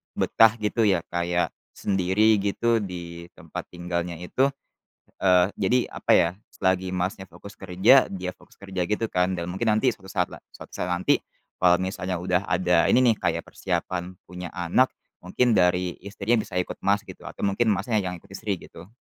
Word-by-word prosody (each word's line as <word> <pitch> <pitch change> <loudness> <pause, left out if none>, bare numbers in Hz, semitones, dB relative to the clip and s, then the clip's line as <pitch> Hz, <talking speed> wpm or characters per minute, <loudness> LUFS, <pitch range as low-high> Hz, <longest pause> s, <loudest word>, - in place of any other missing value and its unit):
betah 115 0 +4
gitu 105 +1 +2
ya, 95 -4 +2
kayak 85 0 0 0.2
sendiri 100 +3 +2
gitu 115 +4 +1
di 85 -3 -7
tempat - - -8
tinggalnya 85 0 -4
itu, 90 +11 0 0.8
eee, 90 -2 +5
jadi 110 +6 +2 0.2
apa - - -3
ya, 85 - +4 0.2
selagi 95 -1 0
Masnya 95 +1 -3
fokus 100 - -12
kerja, 95 +8 +4
dia 90 -1 -5
fokus - - -22
kerja 95 -2 -4
gitu 105 +2 0
kan, 90 -2 0
dan 85 - -3
mungkin 95 +6 -1
nanti 110 +3 +2
suatu 95 -3 -14
saat 90 -3 +1
la - - -13
suatu - - -13
saat 90 - -3
nanti 90 +1 +2 0.4
kalau 90 -1 +6
misalnya 95 -1 -3
udah 90 +1 0
ada 90 -2 +3
ini - - +5 0.2
nih, - - -21
kayak - - -1
persiapan 90 0 -3
punya 90 0 -7
anak, 90 +9 +2 0.3
mungkin 115 +6 +1
dari 90 -1 +2
istrinya 105 +3 0
bisa 90 - -4
ikut 90 - -2
Mas 100 +2 +1
gitu, - - -11
atau - - -4
mungkin 110 +4 +1
Masnya 105 +2 0
yang 90 -1 -4
ikut 100 - -21
istri 100 -3 -3
gitu? 85 +3 -13
95 Hz, 175 wpm, -25 LUFS, 90-105 Hz, 0.8 s, kalau